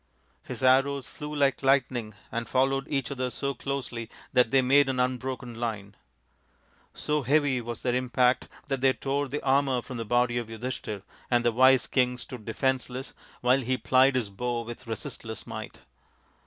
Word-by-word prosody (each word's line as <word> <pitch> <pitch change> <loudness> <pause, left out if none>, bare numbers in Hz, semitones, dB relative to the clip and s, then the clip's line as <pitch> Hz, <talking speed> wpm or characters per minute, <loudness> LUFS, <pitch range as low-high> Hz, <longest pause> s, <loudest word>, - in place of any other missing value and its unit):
His - - -7
arrows 135 +1 +4
flew 150 0 -7
like 140 -2 +2
lightning 130 -5 +1 0.2
and 115 0 -3
followed 135 +1 +1
each 135 -4 -1
other 130 -2 -2
so 140 +2 -2
closely 120 -4 -4 0.2
that 125 -3 +4
they 135 +1 +4
made 135 +2 +5
an 130 -1 -1
unbroken 125 0 -2
line. 105 -4 -4 1.0
So 150 0 0
heavy 140 -1 +2
was 120 -1 -6
their 125 - +1
impact 125 0 +2 0.2
that 135 -2 -2
they 135 0 +5
tore 140 +2 -1
the 145 +3 -4
armour 135 -2 +2
from 130 - -7
the 115 - -2
body 120 +2 +2
of 120 - -5
Yudhishthir, 115 -3 -5 0.3
and 120 -1 +2
the 120 - +4
wise 130 +2 +5
king 125 -1 +1
stood 125 -2 -8
defenceless 130 +2 -2 0.3
while 125 +2 +4
he 130 +1 0
plied 130 +1 +4
his 115 -5 -1
bow 120 +3 -2
with 120 +1 -9
resistless 110 0 -6
might. - - -7
130 Hz, 170 wpm, -28 LUFS, 120-135 Hz, 1.0 s, made